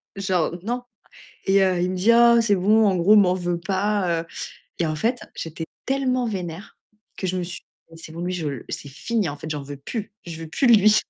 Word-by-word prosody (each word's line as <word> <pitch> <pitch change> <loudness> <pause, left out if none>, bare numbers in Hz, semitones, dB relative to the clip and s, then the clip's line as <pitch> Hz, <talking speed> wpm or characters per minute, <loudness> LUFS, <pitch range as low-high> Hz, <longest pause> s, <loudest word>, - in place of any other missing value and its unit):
genre, 190 -5 0
non. 245 +3 -2 0.6
Et, 195 0 +4
heu, 185 -2 +2
il 180 +1 +1
me 185 - -3
dit: 195 +6 +3
«Oh, 235 0 +7
c'est 205 -3 +3
bon», 210 +4 +4
en 190 - +2
gros, 195 +5 +5
«M'en 185 -3 +5
veux 175 -1 -2
pas», 190 -2 0
heu. 165 - -15 0.5
Et 170 - +1
en 155 0 -2
fait, 235 +8 0 0.2
j'étais 165 0 -6 0.2
tellement 255 -2 +1
vénère 185 -2 -6 0.4
que 190 - -3
je 185 - -1
me 180 - -1
suis 175 +1 -6
dit: - - -41 0.2
«Mais 165 - -13
c'est 160 - -8
bon, 165 - -7
lui 180 +1 -2
je 175 -4 -3
l 135 -5 -6
c'est 145 - -5
fini, 205 - -2
en 145 - -5
fait 155 +2 -8
j'en 150 -2 -3
veux 145 +1 -8
plus, 210 - -6
je 165 -2 -7
veux 165 - -6
plus 260 - +1
de - - +8
lui». 215 0 +6
185 Hz, 245 wpm, -23 LUFS, 165-215 Hz, 0.6 s, de